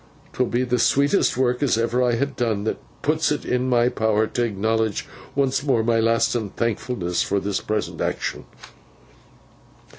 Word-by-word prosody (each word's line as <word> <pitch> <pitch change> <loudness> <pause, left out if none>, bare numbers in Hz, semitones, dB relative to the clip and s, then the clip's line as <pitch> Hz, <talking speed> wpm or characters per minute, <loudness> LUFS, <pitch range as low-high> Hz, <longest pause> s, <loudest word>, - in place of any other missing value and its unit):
'Twill 125 - 0
be 120 +2 0
the 125 -1 0
sweetest 140 - +3
work 125 0 +1
as 135 -6 +2
ever 115 +2 +1
I 120 -1 +2
ha 130 +4 +1
done, 120 -7 -2
that 110 - -2 0.2
puts - - +1
it - - -2
in 125 +1 0
my 120 -1 +3
power 110 -2 +1
t' 120 - -3
acknowledge 110 -1 0 0.3
once 135 -1 +1
more 135 -6 +1
my 115 0 +2
lastin 115 -1 +1
thankfulness 110 -5 -2
for 100 - 0
this 100 0 -2
present 110 0 -3
action. - - -3
115 Hz, 160 wpm, -23 LUFS, 110-125 Hz, 0.3 s, sweetest